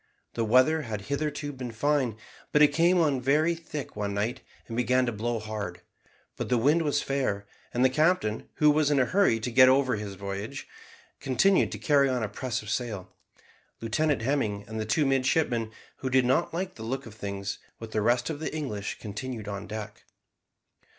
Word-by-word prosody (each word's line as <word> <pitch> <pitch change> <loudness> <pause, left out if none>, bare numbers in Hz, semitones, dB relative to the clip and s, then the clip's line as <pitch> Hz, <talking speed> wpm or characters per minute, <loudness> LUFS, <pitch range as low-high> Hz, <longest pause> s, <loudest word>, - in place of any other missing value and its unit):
The 115 - -1
weather 130 +8 +4
had 110 -6 -5
hitherto 145 0 -2
been 125 -2 -6
fine, 130 -1 0 0.3
but 150 - +5
it 150 - +7
came 170 +4 +4
on 145 -6 +2
very 150 +6 +3
thick 160 -3 -7
one 100 -1 -2
night, 105 +4 -1 0.3
and 115 - -6
began 125 +2 +2
to 120 - -1
blow 115 +2 -2
hard; 110 -1 -5 0.6
but - - -4
the 125 - +3
wind 145 +8 +3
was 145 -2 0
fair, 130 -8 -1 0.3
and 125 +1 +2
the - - +6
captain, 155 -7 +1
who 150 -1 +5
was 150 -1 +2
in 145 -2 +3
a 130 - +4
hurry 190 - +3
to 115 +3 -3
get 130 +2 +7
over 130 -3 +3
his 100 -2 -6
voyage, 100 +7 -5 0.5
continued 180 +9 +3
to - - -4
carry 140 -3 +3
on 125 -3 0
a - - 0
press 120 +3 -4
of 105 - -5
sail. 105 -7 -3 0.7
Lieutenant 125 +3 0
Hemming 110 -7 -1
and 110 +1 -5
the 110 - -2
two 145 +7 +2
midshipmen, 130 -4 +1 0.3
who 130 - -3
did 130 -1 +3
not 130 +7 +2
like 180 +2 -3
the 110 - -9
look 135 +4 -3
of 115 - -10
things, 100 -2 -5 0.2
with 115 -1 -9
the 110 - 0
rest 120 +6 +2
of 145 - -5
the 160 - -3
English, 105 -10 -4
continued 110 +1 -6
on 100 -1 -5
deck. 110 -1 -7
125 Hz, 195 wpm, -28 LUFS, 110-145 Hz, 0.7 s, it